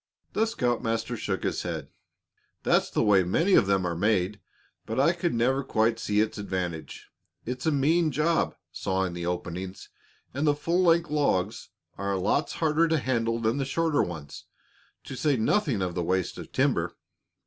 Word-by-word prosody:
The 220 Hz, +1 st, +2 dB
scoutmaster 120 Hz, -, -1 dB
shook 95 Hz, -4 st, -3 dB
his -, -, -1 dB
head. -, -, -5 dB, 0.7 s
"That's -, -, +2 dB
the -, -, +1 dB
way 100 Hz, -2 st, +5 dB
many 165 Hz, -, +2 dB
of 100 Hz, -, +5 dB
them 95 Hz, -2 st, +2 dB
are 85 Hz, -1 st, -1 dB
made, 100 Hz, +1 st, +1 dB, 0.5 s
but -, -, -2 dB
I -, -, +4 dB
could -, -, -1 dB
never 130 Hz, +4 st, +2 dB
quite 115 Hz, -2 st, +1 dB
see 105 Hz, -1 st, +1 dB
its 110 Hz, -1 st, -2 dB
advantage. 90 Hz, -5 st, -5 dB, 0.3 s
It's 125 Hz, +4 st, -4 dB
a -, -, +4 dB
mean 155 Hz, +4 st, +3 dB
job, 155 Hz, +4 st, +1 dB, 0.2 s
sawing 95 Hz, -1 st, -1 dB
the 85 Hz, 0 st, -4 dB
openings, 90 Hz, +2 st, -5 dB, 0.4 s
and 140 Hz, +3 st, 0 dB
the 145 Hz, -, +4 dB
full 170 Hz, +5 st, 0 dB
length 170 Hz, -2 st, +3 dB
logs 110 Hz, -9 st, 0 dB, 0.3 s
are 100 Hz, 0 st, -1 dB
lots 100 Hz, +11 st, 0 dB
harder 160 Hz, +1 st, +2 dB
to 160 Hz, 0 st, +2 dB
handle 115 Hz, -4 st, 0 dB
than 115 Hz, +5 st, 0 dB
shorter 160 Hz, +2 st, +1 dB
ones, 80 Hz, -5 st, -6 dB, 0.6 s
to 135 Hz, -, -7 dB
say 140 Hz, +1 st, +1 dB
nothing 115 Hz, -, +1 dB
of 90 Hz, -1 st, -2 dB
the 90 Hz, -, -2 dB
waste 95 Hz, +1 st, -1 dB
of -, -, -9 dB
timber. -, -, +1 dB
115 Hz, 170 wpm, -27 LUFS, 95-150 Hz, 0.7 s, way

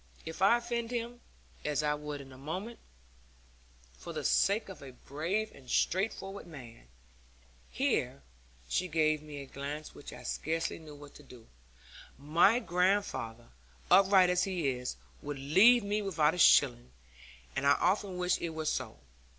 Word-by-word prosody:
If 160 Hz, +2 st, -7 dB
I 200 Hz, +5 st, +6 dB
offend 235 Hz, -1 st, -3 dB
him, 240 Hz, 0 st, -4 dB, 0.4 s
as 150 Hz, 0 st, -1 dB
I 150 Hz, 0 st, +1 dB
would 150 Hz, -1 st, -6 dB
in 135 Hz, -1 st, -13 dB
a -, -, -13 dB
moment, 185 Hz, -, -6 dB, 1.2 s
for -, -, -8 dB
the -, -, -4 dB
sake 205 Hz, +3 st, +2 dB
of 190 Hz, -, -10 dB
a 135 Hz, -2 st, -10 dB
brave 170 Hz, +12 st, -3 dB
and 130 Hz, -2 st, -16 dB
straightforward 195 Hz, 0 st, -1 dB
man' 120 Hz, -, -12 dB, 0.8 s
here 70 Hz, +2 st, -1 dB, 0.4 s
she 185 Hz, -, -1 dB
gave 155 Hz, -2 st, +1 dB
me 150 Hz, -1 st, -9 dB
a -, -, -8 dB
glance 145 Hz, +3 st, -7 dB
which -, -, -11 dB
I 125 Hz, -, -11 dB
scarcely 165 Hz, +7 st, -2 dB
knew 155 Hz, -2 st, -12 dB
what 145 Hz, 0 st, -13 dB
to -, -, -14 dB
do 125 Hz, -3 st, -14 dB
with -, -, -24 dB, 0.7 s
'my 165 Hz, -, +4 dB
grandfather, 180 Hz, -, -1 dB, 0.4 s
upright 190 Hz, -2 st, +6 dB
as 180 Hz, 0 st, +2 dB
he 180 Hz, -7 st, -1 dB
is, 125 Hz, -, -4 dB, 0.3 s
would 145 Hz, -1 st, -5 dB
leave 195 Hz, -, +5 dB
me 205 Hz, +1 st, -1 dB
without 160 Hz, -6 st, +1 dB
a 180 Hz, -, -5 dB
shilling. -, -, +5 dB, 0.7 s
And 140 Hz, -, 0 dB
I 140 Hz, -, +7 dB
often 185 Hz, +3 st, 0 dB
wish 180 Hz, 0 st, +1 dB
it 170 Hz, -, -2 dB
were 160 Hz, 0 st, -4 dB
so. -, -, -2 dB
160 Hz, 160 wpm, -31 LUFS, 140-195 Hz, 1.2 s, I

